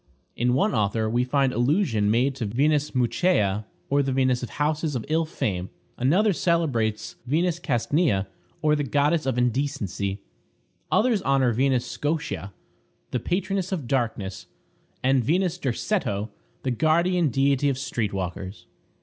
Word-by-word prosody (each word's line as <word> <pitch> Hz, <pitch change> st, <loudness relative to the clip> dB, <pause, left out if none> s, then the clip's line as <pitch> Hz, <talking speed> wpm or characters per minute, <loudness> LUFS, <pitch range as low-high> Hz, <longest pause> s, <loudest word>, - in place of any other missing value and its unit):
In 125 Hz, +1 st, +1 dB
one 135 Hz, -, +2 dB
author 110 Hz, -1 st, +1 dB
we 120 Hz, +3 st, +1 dB
find 135 Hz, 0 st, +1 dB
allusion 120 Hz, -, +2 dB
made 125 Hz, +5 st, +2 dB
to 115 Hz, -5 st, -2 dB
Venus 145 Hz, +6 st, +1 dB
Mucheia, 115 Hz, -, +1 dB, 0.2 s
or 140 Hz, +1 st, +2 dB
the 135 Hz, -1 st, -1 dB
Venus 130 Hz, -1 st, +2 dB
of 125 Hz, -, -5 dB
houses 150 Hz, 0 st, -1 dB
of 115 Hz, -, -3 dB
ill 160 Hz, +1 st, +2 dB
fame. 100 Hz, -, -3 dB, 0.3 s
Another 185 Hz, -, +3 dB
celebrates 140 Hz, -11 st, 0 dB
Venus 170 Hz, +5 st, +1 dB
Castnia, 135 Hz, -, +1 dB, 0.4 s
or 150 Hz, 0 st, +4 dB
the 145 Hz, -, -1 dB
goddess 145 Hz, +2 st, +1 dB
of 130 Hz, -2 st, 0 dB
indecency. 125 Hz, -6 st, -1 dB, 0.7 s
Others 220 Hz, -2 st, +3 dB
honor 135 Hz, -4 st, +2 dB
Venus 130 Hz, +1 st, +1 dB
Scotia, 150 Hz, -, -3 dB, 0.6 s
the 125 Hz, -, 0 dB
patroness 190 Hz, +3 st, -1 dB
of 160 Hz, -10 st, -3 dB
darkness; 110 Hz, -7 st, -2 dB, 0.6 s
and 130 Hz, -1 st, +3 dB
Venus 180 Hz, -, +1 dB
Derceto, 115 Hz, -, -1 dB, 0.3 s
the 130 Hz, -, 0 dB
guardian 165 Hz, +5 st, +2 dB
deity 140 Hz, +2 st, +2 dB
of 135 Hz, -, -1 dB
street 115 Hz, -6 st, -2 dB
walkers. 95 Hz, +1 st, -5 dB
135 Hz, 140 wpm, -25 LUFS, 115-155 Hz, 0.7 s, or